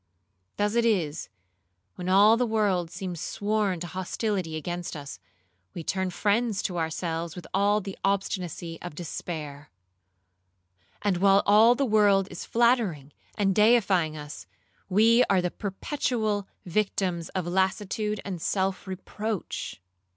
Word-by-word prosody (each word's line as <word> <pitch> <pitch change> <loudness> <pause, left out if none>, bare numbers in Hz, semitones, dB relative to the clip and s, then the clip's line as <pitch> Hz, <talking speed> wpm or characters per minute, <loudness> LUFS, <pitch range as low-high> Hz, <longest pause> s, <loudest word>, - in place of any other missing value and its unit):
Thus 205 +1 +1
it 235 0 +3
is, 175 - 0 0.6
when 180 0 -5
all 205 +4 +7
the 245 +1 +1
world 200 -6 +1
seems 180 -2 -6
sworn 205 -3 -1
to - - -3
hostility 185 -1 -2
against 175 +3 -4
us, 145 -2 -8 0.6
we 170 - -5
turn 190 +3 -1
friends 210 +3 0
to 180 -3 -2
ourselves 165 0 -3
with 180 - -8
all 205 +2 +3
the 195 -1 -7
obstinacy 180 -4 -2
of 175 -4 -7
despair;—and 95 - -8
while 195 +2 +5
all 220 +4 +6
the 275 - +1
world 205 -4 +4
is 175 - -7
flattering 225 - +1 0.2
and 195 -2 +2
deifying 195 -7 +3
us, 145 -11 -9 0.4
we 225 +5 +5
are 195 - +3
the 180 -1 -1
perpetual 215 -1 -2 0.2
victims 180 -2 -1
of 185 -3 -1
lassitude 190 +3 0
and 185 -4 -5
self 190 +1 -1
reproach. 195 - -5
190 Hz, 130 wpm, -27 LUFS, 165-210 Hz, 0.6 s, all